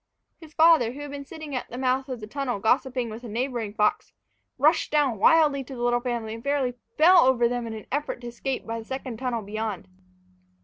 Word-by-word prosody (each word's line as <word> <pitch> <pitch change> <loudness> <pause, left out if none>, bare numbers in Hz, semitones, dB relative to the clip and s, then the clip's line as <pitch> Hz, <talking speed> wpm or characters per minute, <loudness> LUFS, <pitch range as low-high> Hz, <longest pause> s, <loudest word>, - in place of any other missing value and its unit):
His 320 -2 -15
father, 315 -8 +5
who 285 - -8
had 290 -1 -7
been 285 0 -7
sitting 310 -3 -7
at 250 - -4
the 245 - -7
mouth 260 +1 0
of 250 -3 -5
the - - -5
tunnel 255 +1 -3
gossiping 245 +2 +1
with 225 +3 -8
a - - -7
neighboring 230 -2 -3
fox, 210 0 0 0.4
rushed 305 +5 +3
down 285 -8 +2
wildly 295 0 +4
to 265 - -9
the 240 - -5
little 240 0 +2
family, 235 -3 -3
and 225 0 -9
fairly 280 -3 0 0.2
fell 350 +4 +7
over 255 -4 +4
them 240 -1 -3
in 220 - -5
an 215 - -9
effort 290 -1 -2
to 240 - -7
escape 255 +3 -4
by 230 0 -4
the 225 - -10
second 260 -2 -5
tunnel 240 -2 -2
beyond. 210 -2 -4
250 Hz, 220 wpm, -25 LUFS, 230-280 Hz, 0.4 s, fell